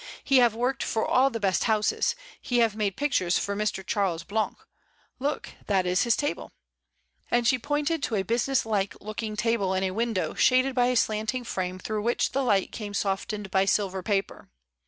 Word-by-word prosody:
"He 275 - +4
have 240 -3 +5
worked 250 +3 -1
for 220 - 0
all 265 +2 +4
the 230 -3 -4
best 195 -4 +1
houses; 215 -2 +1 0.3
he 245 - -1
have 230 -3 +3
made 205 -3 -1
pic 290 0 0
tures 180 -7 +2
for 200 - -2
Mr. 205 -2 -2
Charles 190 -6 -1
Blanc. 205 +2 -2 0.6
Look, 280 +2 -2 0.2
that 195 -3 +2
is 180 +1 +2
his 235 - +3
table," 290 0 -3 0.8
and 240 -1 +2
she 255 0 +3
pointed 295 +4 -1
to 230 - -1
a 195 - +1
business 235 +5 +1
like 205 -3 -1
looking 215 +1 -5
table 210 -3 0
in 190 - 0
a 190 - 0
window 225 -1 -1
shaded 255 +1 +3
by 245 -1 +3
a 250 - +1
slanting 220 +2 0
fi 190 -5 -2
ame 180 +1 -6
through 210 +3 -3
which 235 +3 0
the 275 - 0
light 205 -7 +1
came 205 -2 -6
softened 200 0 -2
by 190 0 +3
silver 195 -2 0
paper. 195 +1 -2
215 Hz, 200 wpm, -27 LUFS, 195-245 Hz, 0.8 s, have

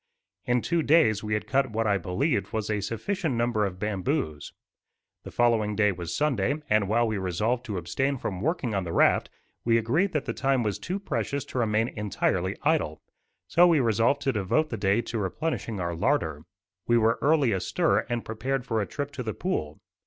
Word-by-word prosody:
In 120 -1 +1
two 170 -1 +1
days 145 -10 +3
we 105 0 -1
had 105 0 -3
cut 130 +3 +1
what 115 +1 -1
I 100 -2 +2
believed 95 - -1
was 110 -1 -2
a 105 -1 0
sufficient 140 - -2
number 115 -3 +1
of 90 -1 -7
bamboos. 100 - -2 0.7
The - - -9
following 115 -3 +2
day 105 -1 +3
was 85 -2 -6
Sunday; 135 -4 +1 0.2
and 105 -2 +3
while 115 +3 +2
we 110 -2 -1
resolved 105 +7 -1
to 105 -6 -4
abstain 135 - -1
from 95 -6 -4
working 140 - -1
on 100 -2 0
the 85 -1 -5
raft, - - +3 0.3
we 115 -1 +3
agreed 150 - +1
that 150 -3 -1
the - - -2
time 135 -2 +1
was 105 -3 -2
too 185 +4 -3
precious 140 - -3
to 130 - -4
remain 110 0 +1
entirely 100 -3 -1
idle; 150 - 0 0.4
so 175 - +5
we 165 -4 +4
resolved 115 +3 +2
to 135 - +1
devote 110 +10 0
the - - -1
day 100 +2 +2
to 115 - -4
replenishing 105 - -3
our 85 -1 -2
larder. 80 - 0 0.4
We 120 - +4
were 115 0 +2
early 145 -5 +3
astir 95 -3 +1
and 120 -1 -2
prepared 125 +4 -2
for 115 -3 0
a 100 - -3
trip 145 -1 -4
to 140 - -6
the 110 -3 -4
pool. 80 - -3
115 Hz, 195 wpm, -27 LUFS, 100-135 Hz, 0.7 s, so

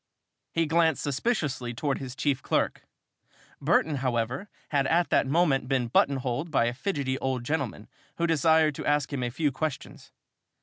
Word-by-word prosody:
He 165 0 +1
glanced 160 -1 +2
suspiciously 140 - -1
towards 140 +2 -1
his 130 -1 -7
chief 140 -3 0
clerk. - - -1 0.7
Burton, 155 -2 +2
however, 125 - -2 0.2
had 140 -3 +1
at 170 +3 +2
that - - +3
moment 140 -4 +2
been 130 -3 0
button 140 +4 +3
holed 130 +5 -3
by 135 -6 +2
a 120 - 0
fidgety 135 -3 -2
old 130 -2 -2
gentleman 135 -7 -3 0.3
who 170 - 0
desired 160 -1 +3
to - - -6
ask 145 -1 +1
him 135 - -2
a 120 - -1
few 145 +4 0
questions. 150 +2 -5
140 Hz, 165 wpm, -27 LUFS, 130-160 Hz, 0.7 s, that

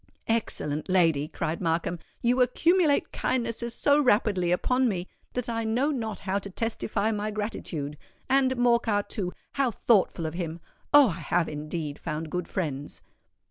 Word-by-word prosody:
"Excellent 155 -10 0
lady!" 165 -6 +3
cried 160 0 -3
Markham; 170 0 0 0.2
"you 245 +2 +3
accumulate 315 +4 +3
kindnesses 235 -1 -1
so 290 +1 +4
rapidly 205 -8 +2
upon 250 +8 +2
me, 180 -3 -3 0.3
that 250 -1 -3
I 230 -1 -1
know 245 +7 +1
not 220 -7 -3
how 195 +1 -1
to 200 - -8
testify 220 0 -1
my 210 0 -2
gratitude. 175 -9 -4 0.3
And, 260 -1 +3
Morcar, 235 -4 +3
too—how 230 +6 -2
thoughtful 200 -7 +2
of 155 - -3
him! 170 -1 -4 0.3
Oh! 290 -4 +8
I 165 - -5
have 170 -2 +1
indeed 150 0 -4
found 155 -1 -4
good 180 -1 -2
friends." 145 -6 -4
205 Hz, 145 wpm, -27 LUFS, 170-240 Hz, 0.3 s, Oh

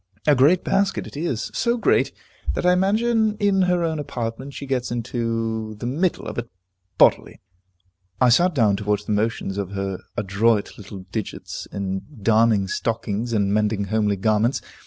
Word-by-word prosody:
A 150 - +5
great 145 +7 +4
basket 195 0 +1
it - - -11
is, 145 -7 -2
so 235 0 +1
great, - - +2 0.4
that - - -2
I 180 - +5
imagine 215 +3 +2
in 200 -2 +2
her 180 -1 +2
own 160 -2 -1
apartment 130 -1 -5
she 140 - -6
gets 130 -2 -1
into 115 -2 -2
the 105 - -7
middle 160 +9 0
of - - -4
it 120 0 -6 0.5
bodily. - - +3 0.8
I 125 - +5
sat 175 +7 +4
down 105 -6 +3
to 105 - -6
watch 105 0 0
the - - -3
motions 105 -2 -1
of 100 -1 -4
her 95 -1 -3 0.2
adroit 105 +2 +1
little 100 -1 -9
digits 110 -4 -5
in 95 -1 -3 0.2
darning 110 -1 +3
stockings, 115 +2 -2
and 100 -3 +1
mending 105 -1 +1
homely 105 -2 +2
garments. 110 +5 +1
115 Hz, 165 wpm, -23 LUFS, 105-150 Hz, 0.8 s, A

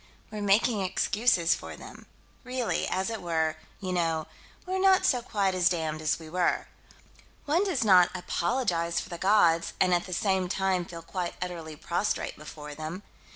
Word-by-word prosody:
We're 210 -1 -5
making 205 +2 +3
excuses 190 -1 +2
for - - -7
them. - - -12 0.4
Really 250 -2 -1
as 190 +4 -1
it 225 - -4
were 160 -2 0 0.2
you 185 -1 -3
know, 165 -3 0 0.4
we're 375 +1 -2
not 380 0 +5 0.3
quite 195 -3 +1
so 185 0 +3
damned 160 -3 -2
as 155 -1 +1
we 160 - -11
were. 175 +2 0 0.8
One 325 +6 +2
does 360 -11 0
not 185 -4 +6
apologize 175 -2 0
for - - -7
the 170 - -6
gods 175 -5 +3
and 185 -1 +4
at 175 +1 +1
the - - -8
same 190 -1 +1
time 190 -2 0
feel 170 -1 -9
quite 180 0 -4
utterly 170 -3 -5
prostrate 175 +6 -2
before 150 -1 -9
them. 155 +6 -6
180 Hz, 165 wpm, -28 LUFS, 165-205 Hz, 0.8 s, not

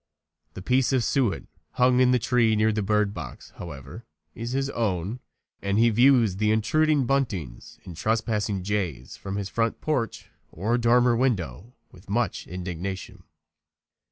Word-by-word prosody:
The 95 - -7
piece 130 +4 +2
of 130 -3 +2
suet 125 -7 0 0.3
hung 125 0 +3
in 130 -1 +5
the 125 - +4
tree 120 -2 +2
near 110 +1 +3
the 105 0 -1
bird 105 0 +1
box, - - -9
however, 75 - -9 0.3
is 115 +1 -5
his 135 +1 -1
own, 105 -1 -2 0.4
and 100 0 0
he 115 +1 +5
views 120 -4 +4
the 105 +1 +1
intruding 145 +6 +2
buntings 100 - -2
and 90 - -8
trespassing 105 -1 -1
jays 90 -11 -3
from 95 0 -6
his 100 -1 -3
front 115 +2 -1
porch 130 -8 -2 0.2
or 110 +8 -1
dormer 120 +1 +4
window 110 - -1 0.2
with 90 +2 -17
much 120 +4 -1
indignation. 90 +1 -6
110 Hz, 150 wpm, -25 LUFS, 95-125 Hz, 0.4 s, in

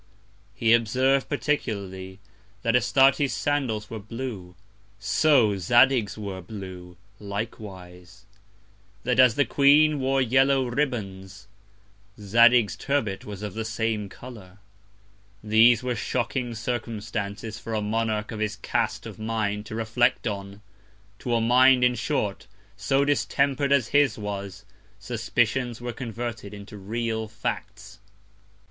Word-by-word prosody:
He 115 -1 +3
observ'd, 130 +4 +2
particularly, 100 -11 -3 0.5
that 115 +1 +2
Astarte's 135 +1 +3
Sandals 120 -6 -2
were 110 - -5
blue; 105 -4 -7 0.4
so 110 0 +3
Zadig's 120 +3 +3
were 100 -3 -6
blue 90 -2 -9 0.2
likewise; 95 -4 -8 0.8
that 125 +1 0
as 125 -3 +6
the 145 - +3
Queen 145 +4 +4
wore 135 +1 +1
yellow 135 +2 +3
Ribbands, 100 -8 -3 0.7
Zadig's 115 +2 +4
Turbet 115 -9 -2
was 105 -1 -8
of 105 -3 -5
the 110 - -3
same 110 -2 -2
Colour: 100 -5 -12 0.9
These 115 +3 +5
were 125 -1 -1
shocking 120 +1 -2
Circumstances 110 -2 -4
for 115 - -5
a - - 0
Monarch 110 0 -1
of 110 - -6
his 105 -1 -1
Cast 110 0 -2
of 110 -2 -9
Mind 105 -1 -2
to 110 - -6
reflect 115 +2 +1
on! 100 -1 -5 0.6
To 120 -1 -1
a 115 - +2
Mind, 125 +2 +5
in 125 0 +4
short, 115 -4 -2 0.3
so 135 +7 +1
distemper'd 140 -1 +1
as 130 -4 +3
his 145 -1 +3
was, 100 -2 -6 0.3
Suspicions 120 0 -1
were 120 0 -5
converted 115 -3 -6
into 100 +1 -11
real 110 +2 -3
Facts. 105 -1 -6
110 Hz, 120 wpm, -25 LUFS, 105-125 Hz, 0.9 s, as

